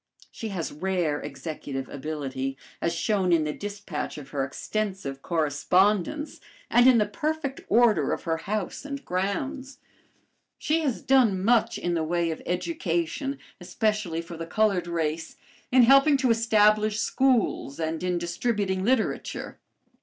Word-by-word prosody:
She 225 - -6
has 185 -6 -3
rare 170 -2 -1
executive 135 -1 -6
ability, 135 -2 -4 0.2
as 170 0 0
shown 185 +1 +1
in 165 -2 +4
the 150 0 -2
dispatch 205 -7 -5
of 140 -2 -9
her 140 -2 -1
extensive 185 -1 -4
correspondence 180 - +1 0.3
and 240 +1 +6
in 255 -2 +7
the 210 - +3
perfect 295 +4 -3
order 220 - +4
of - - -3
her 165 -1 0
house 195 +4 -3
and 280 -1 -6
grounds. 260 +9 -3 0.8
She 315 +2 +1
has 280 -7 -2
done 230 -9 +3
much 235 -1 +3
in 175 - -2
the 165 -2 0
way 170 +1 0
of 160 - -6
education, 175 - -2 0.2
especially 185 -2 -1
for 170 0 -9
the 165 0 -6
colored 195 -2 +1
race, 165 -1 -2 0.4
in 255 -1 +6
helping 275 +4 +6
to 260 -3 +2
establish 215 -2 +3
schools 230 - +1
and 160 0 -2
in 180 -1 0
distributing 190 +2 -1
literature. 245 +1 -1
190 Hz, 140 wpm, -26 LUFS, 165-230 Hz, 0.8 s, in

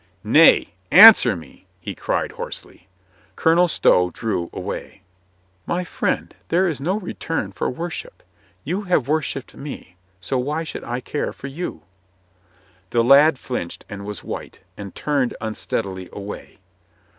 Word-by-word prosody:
"Nay, - - +5 0.2
answer 195 - +9
me 80 - -13
!" - - -40
he - - -6
cried - - -2
hoarsely. 90 - -9 0.5
Colonel 170 +2 +4
Stow 90 - +3
drew 90 -3 -3
away. - - -7 0.6
"My 175 +1 -1
friend, 175 - -2
there 180 +3 +2
is 155 -5 -3
no 180 +8 0
return 165 - -4
for 95 - -2
worship. 175 - -6 0.4
You 190 +3 -2
have 165 -9 +1
worshipped 145 -3 -2
me, 135 -10 -9 0.2
so 125 +8 -2
why 150 +6 -2
should 160 - -7
I 120 +1 -4
care 145 - -3
for - - -12
you 140 - -6 0.5
?" 90 0 -35
The 115 -1 +2
lad 140 +4 +6
flinched 125 -10 -5
and 100 -2 -7
was 105 -2 -7
white, - - -7 0.2
and 100 -2 -9
turned 140 -5 -1
un 110 0 -4
steadily 95 -5 -4
away. 100 0 -8
130 Hz, 145 wpm, -21 LUFS, 100-160 Hz, 0.6 s, answer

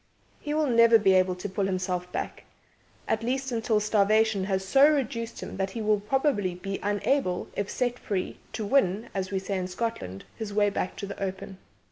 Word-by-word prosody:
He 295 0 -3
will 310 0 +2
never 230 -3 +6
be 195 -3 +4
able 185 -1 +3
to 180 +3 -5
pull 195 0 -1
himself 185 -1 -2
back - - -5 0.6
at 220 - 0
least, 265 +3 -2
until 225 -2 +1
starvation 210 -1 +2
has 190 -1 -1
so 275 +8 +6
reduced 235 -5 -2
him - - -7
that 190 0 -1
he 225 +3 -5
will 210 -1 +3
probably 210 - 0
be 195 +2 -5
unable, 205 -1 0
if 200 0 -2
set 245 -1 -1
free, 190 -3 -3
to 220 -1 -3
win 205 -3 +2
(as 190 -1 -2
we 195 - -1
say 190 0 -2
in 180 - -3
Scotland) 185 - -4
his 210 -3 -6
way 205 -1 +3
back 190 - -2
to - - -5
the 200 - -8
open. 190 0 -5
205 Hz, 195 wpm, -27 LUFS, 190-230 Hz, 0.6 s, never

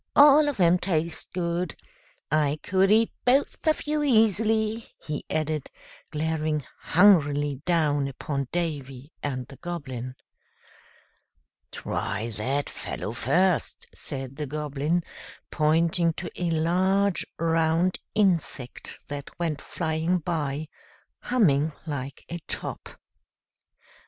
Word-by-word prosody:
All 290 +1 +8
of 280 - -5
'em 175 0 +5
taste 170 -3 -1
good. 175 -1 -2 0.6
I 150 -1 +2
could 190 +1 +3
eat 220 +2 +4
both 270 +5 +1
of 310 - +2
you 300 0 0
easily," 220 -3 +2
he 150 -1 -5
added, 155 -2 -1 0.4
glaring 155 -1 -1 0.2
hungrily 145 -7 +4
down 150 -5 +2
upon 140 0 -3
Davy 145 -5 -3
and 130 -3 -3
the 135 +1 -13
Goblin. 130 -7 -5 1.6
"Try 110 +3 -3
that 130 +7 -2
fellow - - -5
first," 165 +10 +1
said 135 -2 -5
the 150 -1 -3
Goblin, 150 +3 -1 0.5
pointing 165 +2 +2
to 170 +1 -6
a 175 -1 -1
large, 185 +4 +2
round 165 +2 +2 0.2
insect 170 - 0
that 145 -1 -6
went 160 -4 -2
flying 160 +2 -1
by, 155 -3 -2 0.5
humming 160 - +2
like 140 -3 -5
a 170 - -5
top. - - -3
160 Hz, 105 wpm, -26 LUFS, 145-180 Hz, 1.6 s, All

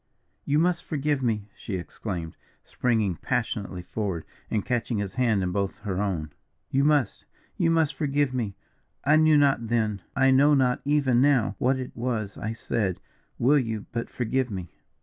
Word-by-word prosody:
"You 145 - +2
must 175 +2 +2
forgive 145 -2 -1
me," 110 -5 -1
she 100 - -5
exclaimed, 85 -2 -5 0.3
springing 110 -8 0
passionately 105 -7 -2
forward, 95 -4 -3 0.2
and 105 -3 -1
catching 120 -2 -1
his 100 -2 -3
hand 115 -6 +2
in 90 - -1
both 100 +1 -1
her 95 -2 -2
own, 85 -7 -2 0.4
"you 135 +1 +3
must 145 -7 +2 0.3
you 165 - +2
must 165 -3 +2
forgive 145 -3 0
me. 110 -6 -2 0.5
I 150 +2 +5
knew 155 -1 +5
not 135 -5 +3
then, 110 -4 0
I 135 0 +4
know 145 +3 +5
not 125 -2 +2
even 140 -4 +3
now, 130 -8 +3
what 130 +2 +2
it 130 -1 -6
was 115 -4 -2
I 110 - -4
said 105 -4 -2 0.4
will 140 +4 +4
you 115 -4 -3
but 115 0 -3
forgive 125 +1 -1
me?" 95 -5 -6
120 Hz, 170 wpm, -26 LUFS, 100-140 Hz, 0.5 s, I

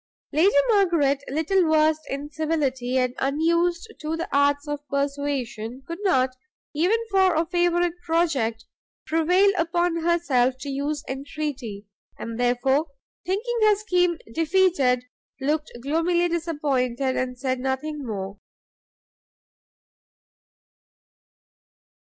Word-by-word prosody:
Lady 325 +5 +4
Margaret, 335 -10 +3
little 320 +5 +1
versed 310 0 +2
in 285 +2 -5
civility, 280 -5 -1
and 250 -1 +1
unused 335 +8 0
to 315 +1 -2
the 335 - -3
arts 285 +1 +2
of 295 0 -3
persuasion, 275 -4 -3
could 335 +3 -6
not, 265 -10 +2 0.4
even 355 +9 +2
for 380 -2 +4
a 325 +2 +2
favourite 350 0 +1
project, 275 -10 0 0.4
prevail 360 +5 +3
upon 345 +1 +1
herself 320 -7 +2
to 280 - -6
use 285 +2 -2
entreaty, 265 -6 -5 0.3
and 230 0 -6
therefore, 265 +5 +2 0.4
thinking 460 +6 -1
her 425 -1 +5
scheme 360 -5 +1 0.2
defeated, 325 -7 +2 0.4
looked 300 +3 -1
gloomily 335 +4 +1
disappointed, 280 -6 -1
and 250 -1 -2
said 260 0 -2
nothing 265 +4 -2
more. 200 -4 -5
300 Hz, 105 wpm, -24 LUFS, 265-340 Hz, 0.4 s, her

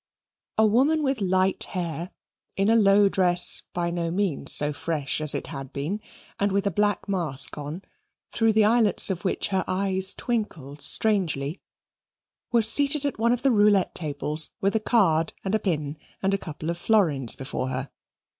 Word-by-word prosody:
A 220 - +4
woman 275 +9 +2
with 270 -5 -1
light 190 0 0
hair, 175 -2 -5 0.5
in 200 +3 +2
a - - +4
low 205 -2 +4
dress 180 -2 +3
by 170 -1 -3
no 170 -1 -3
means 185 -3 +2
so 150 0 +3
fresh 150 -1 -3
as 155 -2 +2
it - - -4
had 135 -1 -8
been, 160 +10 -4 0.4
and 200 0 0
with 200 +1 -1
a 200 - 0
black 205 +2 -1
mask 165 -9 -1
on, 150 +5 -7 0.5
through 225 -1 +1
the 215 -1 +3
eyelets 220 -3 +3
of 180 -2 -5
which 190 - -2
her 190 -1 -1
eyes 190 0 -1
twinkled 155 - -5
strangely, 175 -8 +1 0.9
was 230 -2 +5
seated 285 +4 +4
at 280 - -3
one 235 +1 +2
of 245 0 -2
the 270 - +3
roulette 205 -3 +2
tables 150 0 -2
with 195 +2 -1
a - - +2
card 180 -8 +1
and 190 - -2
a 220 - +2
pin 155 -7 -3 0.3
and 195 +1 +1
a - - +1
couple 160 -1 -6
of 170 - -7
florins 160 - +2
before 130 -1 -5
her. 130 +1 -5
190 Hz, 175 wpm, -24 LUFS, 155-215 Hz, 0.9 s, was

